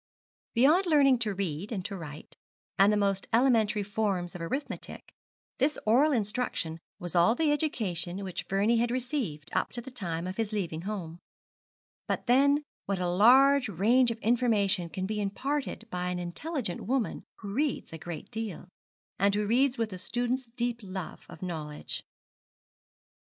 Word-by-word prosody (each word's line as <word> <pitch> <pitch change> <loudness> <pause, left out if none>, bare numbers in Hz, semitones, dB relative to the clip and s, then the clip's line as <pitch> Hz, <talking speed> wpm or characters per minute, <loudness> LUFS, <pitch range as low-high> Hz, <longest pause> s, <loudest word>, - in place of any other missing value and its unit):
Beyond 310 +11 +5
learning 275 -6 +5
to 215 -4 -1
read 185 +1 -3
and 190 -5 -3
to 205 - -4
write, 155 -4 -9 0.4
and 195 +2 +7
the 210 - +2
most 200 -1 +1
elementary 225 -4 +3
forms 195 -4 -1
of 180 - -7
arithmetic, 265 - -5 0.5
this 285 +4 +2
oral 260 +8 +5
instruction 210 - -1 0.2
was 175 -3 -5
all 175 +7 +5
the 315 0 +2
education 200 - -1
which 175 -3 -5
Vernie 205 +4 +3
had 235 +1 +2
received 245 - -2
up - - 0
to 245 - -2
the 255 +3 -8
time 175 -8 -3
of 185 +1 -5
his 225 -2 -1
leaving 175 -6 -2
home; 175 -5 -5 0.9
but - - -2
then 280 +4 +4 0.2
what 200 -1 0
a 180 -1 -1
large 250 +8 +6
range 230 +7 +4
of 230 - -3
information 210 -6 +2
can 185 +3 -3
be 210 +1 -2
imparted 255 +4 -2
by 180 0 -2
an 180 - -2
intelligent 200 - -4
woman 250 +1 -1
who 200 -2 -7
reads 280 - -1
a 160 - -6
great 165 -2 -7
deal, 215 -5 -5 0.5
and 200 +1 +3
who 210 0 +1
reads 255 +4 +3
with 225 -2 -1
the 185 - -6
student's 245 +3 -2
deep 240 0 -2
love 190 -3 -7
of 160 - -10
knowledge. 155 -4 -5
210 Hz, 165 wpm, -29 LUFS, 180-250 Hz, 0.9 s, and